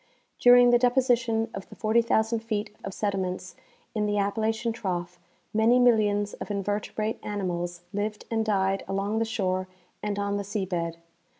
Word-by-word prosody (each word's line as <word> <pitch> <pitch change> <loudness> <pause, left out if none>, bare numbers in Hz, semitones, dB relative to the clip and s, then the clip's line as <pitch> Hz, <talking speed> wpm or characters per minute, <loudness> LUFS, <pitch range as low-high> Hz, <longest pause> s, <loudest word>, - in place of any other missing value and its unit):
During 245 0 +7
the 240 - +5
deposition 240 -3 +2
of 195 - -7
the - - -11
40,000 225 0 +2
feet 215 -2 -3
of 195 - -4
sediments 190 -2 -3 0.4
in 210 -1 0
the 205 0 0
Appalachian 220 +3 0
trough 180 -5 -4 0.3
many 225 +3 +4
millions 210 -4 +3
of - - -7
invertebrate 205 +2 -2
animals 175 -4 -3
lived 210 +1 -3
and 225 -1 +1
died 195 -2 +1
along 200 +3 -1
the 225 - +1
shore 185 -4 -1 0.3
and 205 -1 -2
on 200 0 -1
the 200 - -2
sea 200 0 -2
bed. 170 -2 -3
210 Hz, 155 wpm, -27 LUFS, 195-225 Hz, 0.4 s, During